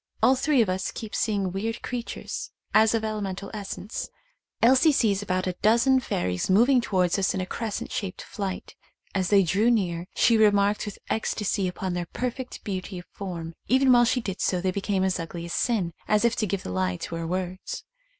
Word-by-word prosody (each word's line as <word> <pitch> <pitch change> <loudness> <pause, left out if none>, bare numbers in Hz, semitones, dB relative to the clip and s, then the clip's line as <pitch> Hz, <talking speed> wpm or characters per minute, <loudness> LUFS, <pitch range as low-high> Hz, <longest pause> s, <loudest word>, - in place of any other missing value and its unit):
All 260 - +6
three 265 -2 +3
of - - -4
us 185 0 -1
keep 220 -2 -7
seeing 200 -4 0
weird 225 +5 -3
creatures 245 -2 -5 0.2
as 220 +1 +5
of 225 - -1
elemental 200 -3 -4
essence. 200 -1 -5 0.5
Elsie 260 +7 +6
sees 210 -8 +2
about 185 -2 -1
a 185 - -1
dozen 235 +5 +4
fairies 90 - -2
moving 240 +7 +5
towards 185 -4 +1
us 190 - +1
in - - -1
a 185 - -1
crescent 220 +2 -4
shaped 190 -2 -4
flight. 195 -3 -5 0.4
As 190 -2 0
they 200 -2 +6
drew 200 +7 +2
near 180 -7 0
she 230 -2 +4
remarked 205 -1 +3
with 205 - -6
ecstasy 210 -2 0
upon 180 0 -3
their 175 -1 -3
perfect 250 +4 -5
beauty 190 -1 -4
of 175 - -8
form 170 -4 -6
— - - -41
even 260 +1 +4
while 240 -1 +6
she 250 +1 +1
did 195 -4 -5
so 180 - +1
they 185 +1 0
became 195 0 -1
as 190 -1 0
ugly 170 +1 -5
as 170 - -5
sin, 195 -8 0
as 210 +2 +3
if 235 - +3
to 215 - 0
give 195 0 -2
the - - -5
lie 90 -1 0
to - - -6
her 165 0 -4
words. 185 +1 -4
200 Hz, 200 wpm, -26 LUFS, 185-225 Hz, 0.5 s, All